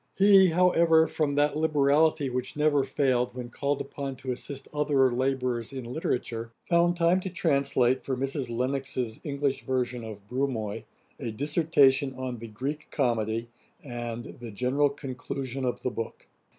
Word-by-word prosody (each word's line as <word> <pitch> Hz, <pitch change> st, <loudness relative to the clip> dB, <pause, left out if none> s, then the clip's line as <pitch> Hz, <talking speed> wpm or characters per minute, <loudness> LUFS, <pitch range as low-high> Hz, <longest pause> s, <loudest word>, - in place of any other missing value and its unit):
He, 195 Hz, -1 st, +7 dB
however, 170 Hz, -2 st, +4 dB
from 145 Hz, -3 st, -1 dB
that 145 Hz, 0 st, +2 dB
liberality 150 Hz, 0 st, +3 dB
which 125 Hz, 0 st, -3 dB
never 150 Hz, -2 st, +3 dB
failed, 130 Hz, -3 st, 0 dB
when 125 Hz, -1 st, -6 dB
called 140 Hz, +2 st, -1 dB
upon 140 Hz, -2 st, -5 dB
to 130 Hz, 0 st, -5 dB
assist 135 Hz, +2 st, -6 dB
other 145 Hz, -3 st, +3 dB
labourers 125 Hz, -2 st, -1 dB
in 130 Hz, -2 st, -6 dB
literature, 120 Hz, -3 st, -3 dB
found 175 Hz, 0 st, +2 dB
time 170 Hz, +2 st, +3 dB
to 190 Hz, -, -4 dB
translate 140 Hz, -7 st, +2 dB
for 130 Hz, -2 st, -2 dB
Mrs. 135 Hz, -1 st, -2 dB
Lennox's 125 Hz, -1 st, -2 dB
English 140 Hz, -2 st, -1 dB
version 125 Hz, -2 st, -1 dB
of 105 Hz, -2 st, -9 dB
Brumoy, 125 Hz, -4 st, -2 dB, 0.3 s
'A 115 Hz, -, -4 dB
Dissertation 140 Hz, -1 st, +3 dB
on 130 Hz, -2 st, -5 dB
the 115 Hz, -, -7 dB
Greek 135 Hz, +8 st, -5 dB
Comedy,'[dagger] 115 Hz, -4 st, 0 dB, 0.4 s
and 120 Hz, -1 st, -4 dB, 0.2 s
'The 120 Hz, -1 st, -7 dB
General 130 Hz, +7 st, +2 dB
Conclusion 135 Hz, -1 st, -5 dB
of 125 Hz, -, -2 dB
the 125 Hz, -, 0 dB
book.' 115 Hz, -, -6 dB
135 Hz, 150 wpm, -27 LUFS, 125-145 Hz, 0.4 s, He